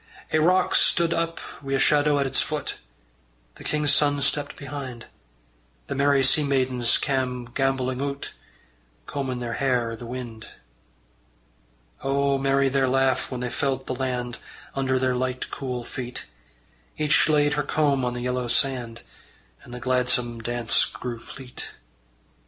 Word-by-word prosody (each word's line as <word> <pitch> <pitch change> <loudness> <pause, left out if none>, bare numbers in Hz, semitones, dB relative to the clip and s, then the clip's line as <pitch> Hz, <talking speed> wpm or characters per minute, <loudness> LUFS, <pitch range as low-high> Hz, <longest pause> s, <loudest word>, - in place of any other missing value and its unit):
Ae 155 - +4
rock 180 +3 +3
stud 170 -1 +4
up 165 0 -1 0.2
wi' 135 -1 -4
a - - +3
shadow 145 +1 +4
at 140 - +1
its 135 - +2
foot: 150 -2 -3 0.8
The - - -11
king's 150 -1 +2
son 145 0 +3
stepped 145 +1 +1
behind: 135 -4 -7 0.8
The - - -4
merry 140 0 +3
sea 150 +3 +5
maidens 130 -4 +2
cam' 130 -3 -1
gambolling 130 0 0
oot, 140 0 -4 0.7
Combin' 130 - -3
their 120 -1 -3
hair 125 -4 +1
i' - - -4
the 115 +1 -9
wind. 120 -3 -7 1.6
O 140 0 +1
merry 135 0 +2
their 135 0 +2
laugh 130 0 +2
when 125 -2 -5
they 125 - -2
felt 135 -1 -1
the - - -3
land 125 -2 -3 0.3
Under 135 -1 +1
their 130 0 +1
light 130 0 -2
cool 125 -3 -4
feet! 125 +1 -6 0.7
Each 155 +1 +3
laid 150 -1 +3
her 150 - +1
comb 145 -2 +1
on 125 0 -1
the 120 - -4
yellow 125 0 -1
sand, 120 -2 0 0.6
And - - -14
the 125 - -6
gladsome 125 -2 +1
dance 115 -4 +2
grew 120 -2 -5
fleet. 130 +1 -8
130 Hz, 150 wpm, -25 LUFS, 125-140 Hz, 1.6 s, sea